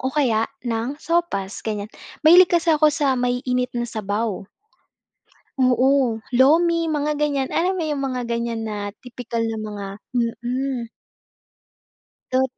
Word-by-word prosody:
o 260 - -1
kaya 250 -6 +1 0.2
ng 235 +4 -2
sopas, 330 - -1
ganyan. 210 -1 -4 0.3
Mahilig 350 +3 +8
kasi 340 -1 +2
ako 305 0 +5
sa 285 -2 +1
maiinit 250 0 0
na 240 - 0
sabaw. 210 -2 -3 1.1
Oo, 255 -2 +3
lomi 330 +6 +4
mga 300 -1 0
ganyan. 285 -3 0
Alam 365 +3 +1
mo 360 - -2
yung 295 -3 -2
mga 255 -1 -3
ganyan 235 -1 -2
na 215 -1 -4 0.3
tipikal 240 -2 -4
na 225 -1 -2
mga 210 -2 -6 0.3
mm. 245 +1 -2 1.5
Tot 260 0 +2
250 Hz, 130 wpm, -22 LUFS, 230-295 Hz, 1.5 s, Mahilig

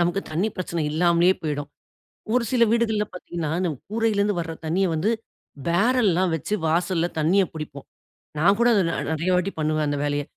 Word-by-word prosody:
நமக்கு 175 +3 +1
தண்ணீ 175 +8 0
பிரச்சனை 170 -2 -2
இல்லாமலே 170 +2 +4
போய்டும். 145 -2 -3 0.6
ஒரு 250 0 +2
சில 240 -2 +5
வீடுகள்ல 220 -3 +1
பார்த்திங்கன்னா, 170 -3 -5
அந்த 180 - 0 0.2
கூரையிலருந்து 210 -3 +1
வர்ற 165 -1 -4
தண்ணிய 185 +4 +1
வந்து, 170 +8 +1 0.6
பேரல்லாம் 190 -1 +2
வச்சு 185 +7 -3
வாசல்ல 170 +1 +1
தண்ணிய 170 +6 +3
புடிப்போம். 150 -3 -7 0.5
நான் 195 +6 +4
கூட 240 - +5
அத 200 - +4
நெ - - -1 0.2
நெறைய 160 +3 -1
வாட்டி 180 +2 +1
பண்ணுவேன் 155 -1 0
அந்த 145 - -1
வேலைய. 145 0 0
175 Hz, 160 wpm, -24 LUFS, 160-200 Hz, 0.6 s, சில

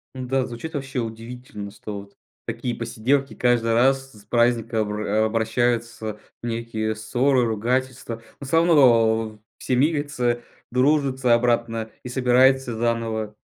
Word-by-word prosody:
Да, 130 0 -1
звучит 140 +7 -7
вообще 135 -2 -3
удивительно, 115 -2 -7
что 100 -1 -7
вот 100 0 -18 0.3
такие 120 +1 -3
посиделки 125 +4 0
каждый 120 -2 +2
раз 135 +2 +2
с 105 -1 -17
праздника 120 -1 +1
обра 105 +1 0
обращаются 115 -1 -1 0.2
в - - -4
некие 115 -2 -2
ссоры, 125 +3 +1
ругательства. 120 +2 -2 0.2
Но 140 - -7
всё 165 +5 +1
равно 115 -9 +4 0.2
все 130 - -1
мирятся, 135 -4 +1 0.3
дружатся 130 -1 +2
обратно 115 -2 +1
и 125 - -6
собираются 130 0 +3
заново. 115 -2 -1
120 Hz, 125 wpm, -23 LUFS, 110-130 Hz, 0.3 s, равно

